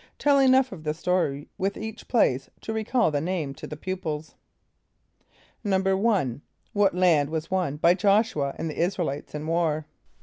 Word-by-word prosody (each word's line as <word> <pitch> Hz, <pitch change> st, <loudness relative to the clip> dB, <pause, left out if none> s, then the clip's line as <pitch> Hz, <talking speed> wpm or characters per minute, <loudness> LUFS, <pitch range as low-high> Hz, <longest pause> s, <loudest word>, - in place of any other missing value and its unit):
(Tell 285 Hz, -1 st, +4 dB
enough 265 Hz, -1 st, +4 dB
of 175 Hz, -6 st, -9 dB
the 150 Hz, 0 st, -2 dB
story 165 Hz, -5 st, -1 dB
with 195 Hz, +1 st, -1 dB
each 220 Hz, +1 st, -7 dB
place 135 Hz, -, +2 dB
to 220 Hz, -, -4 dB
recall 220 Hz, -3 st, +1 dB
the 145 Hz, -1 st, 0 dB
name 165 Hz, -5 st, -2 dB
to -, -, -9 dB
the 150 Hz, -, -7 dB
pupils.) 160 Hz, -3 st, -4 dB, 1.3 s
=1.= 190 Hz, -, +1 dB, 0.3 s
What 200 Hz, -3 st, +3 dB
land 165 Hz, -6 st, +3 dB
was 160 Hz, +1 st, -4 dB
won 180 Hz, -6 st, 0 dB
by 170 Hz, +3 st, +5 dB
J[)o]sh´u 200 Hz, -6 st, +2 dB
[.a] -, -, -15 dB
and -, -, -3 dB
the 155 Hz, -, -3 dB
[)I][s+]´ra 180 Hz, +3 st, 0 dB
el -, -, 0 dB
[=i]tes 145 Hz, +2 st, -8 dB
in 150 Hz, +1 st, -4 dB
war? 160 Hz, -2 st, 0 dB
180 Hz, 175 wpm, -26 LUFS, 150-200 Hz, 1.3 s, by